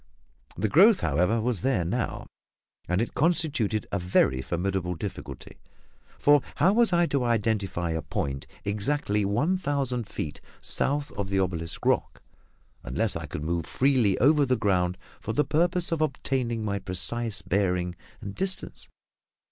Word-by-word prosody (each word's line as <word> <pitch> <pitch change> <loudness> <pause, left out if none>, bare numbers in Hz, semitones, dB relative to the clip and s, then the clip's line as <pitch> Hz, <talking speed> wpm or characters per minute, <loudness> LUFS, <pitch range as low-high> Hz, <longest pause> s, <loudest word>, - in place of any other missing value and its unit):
The 105 +5 0
growth, 195 - +6
however, 90 +9 +1
was 115 -2 -1
there 125 -10 +1
now, 115 +8 -2 0.6
and 90 +3 +1
it - - -6
constituted 150 - +1
a 100 - 0
very 90 -7 +2
formidable 90 +2 -2
difficulty, 100 +4 -8 0.6
for 145 -1 +5
how 175 +7 +4
was 235 -1 +4
I 175 0 +4
to 140 -5 0
identify 105 -7 0
a 80 0 -2
point 70 -1 -4 0.2
exactly 105 +1 0
one 150 - +1
thousand 135 - -1
feet 75 - -5 0.2
south 145 +1 +1
of 100 -1 -4
the 100 - 0
obelisk 85 -4 -2
rock, - - 0 0.6
unless - - 0
I - - -5
could 75 - -6
move 85 0 -2
freely 125 - +2
over 145 +4 +4
the 130 -2 +1
ground 90 -4 +1 0.2
for 110 - -4
the 150 - +2
purpose 170 +5 +1
of 165 -2 0
obtaining 130 -6 -1
my 100 -1 -1
precise 100 +3 0
bearing 90 -2 0 0.3
and 100 - -6
distance? 190 - -3
110 Hz, 150 wpm, -26 LUFS, 90-140 Hz, 0.6 s, growth